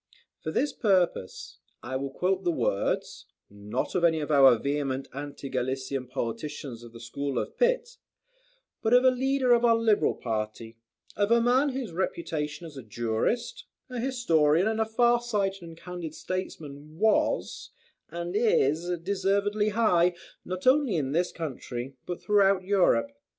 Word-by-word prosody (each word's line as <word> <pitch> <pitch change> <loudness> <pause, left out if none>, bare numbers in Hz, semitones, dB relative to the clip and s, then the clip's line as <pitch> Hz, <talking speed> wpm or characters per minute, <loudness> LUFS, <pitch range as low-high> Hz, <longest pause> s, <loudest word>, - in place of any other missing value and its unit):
For - - -5
this 275 - 0
purpose, 185 - 0 0.2
I 130 +2 -5
will 135 +1 -2
quote 185 +7 -1
the 175 - +1
words, 120 -10 -1 0.2
not 105 +4 -4
of 180 - 0
any 165 -2 +4
of 150 0 -3
our 135 -4 +7
vehement 140 0 -2
anti 140 0 -7
Gallican 130 0 -3
politicians 125 0 -5
of 120 -1 -12
the 115 - -12
school 135 +4 -4
of - - -3
Pitt, - - 0 0.8
but 225 +2 +3
of 250 - +6
a 260 - +7
leader 260 0 +2
of 240 0 +3
our 230 -1 +5
Liberal 220 -8 +2
party, 110 0 -4 0.4
of 205 0 +1
a 235 0 +5
man 250 +5 +3
whose 255 -6 -4
reputation 165 -3 -3
as 155 -4 -10
a - - -6
jurist, 115 - -2 0.3
a 250 - -4
historian 180 - +2
and 220 0 0
a - - +2
far 240 +2 +3
sighted 200 -5 -1
and 165 -1 -11
candid 175 -3 -7
statesman, 155 -5 -6
was, 215 +3 +1 0.4
and 170 +2 -5
is, 175 - +2
deservedly 200 +2 +1
high, 180 -5 +3 0.3
not 185 0 -6
only 260 -5 +4
in 140 -4 -1
this 175 +4 0
country, 135 -4 -6
but 175 - -4
throughout 195 -2 +3
Europe. 205 +9 +2
175 Hz, 155 wpm, -27 LUFS, 140-220 Hz, 0.8 s, our